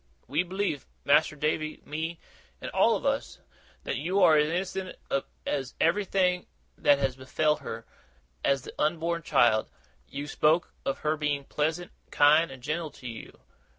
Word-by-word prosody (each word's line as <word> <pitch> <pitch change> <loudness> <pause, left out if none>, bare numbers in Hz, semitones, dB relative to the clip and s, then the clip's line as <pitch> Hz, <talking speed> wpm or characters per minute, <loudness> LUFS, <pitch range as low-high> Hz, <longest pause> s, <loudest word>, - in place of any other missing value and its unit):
We 145 +7 +1
believe 185 -4 -2 0.2
Mas'r 155 +2 +4
Davy, 155 +1 -1
me, 160 +2 -4 0.4
and - - -6
all - - +4
of - - -5
us - - -1 0.5
that - - -2
you 180 +8 0
are 165 -3 +7
as 150 0 +4 0.3
innocent 190 -1 -4 0.2
of 140 - 0 0.5
everything 180 0 +2 0.3
that 145 - +4
has 135 -2 0
befell 150 +4 +1
her, - - -7 0.6
as 140 -2 +2
the - - -9
unborn 165 +2 0
child. 110 -7 +3 0.4
You've 145 +1 -6
spoke 160 +3 +2
of 135 - -1
her 155 +1 0
being 145 -2 -1
pleasant, 160 +5 -2 0.2
kind, 155 +3 +5
and 130 -2 -11
gentle 160 +3 -2
to 135 -3 -11
you. 115 -2 -9
155 Hz, 150 wpm, -28 LUFS, 140-170 Hz, 0.6 s, are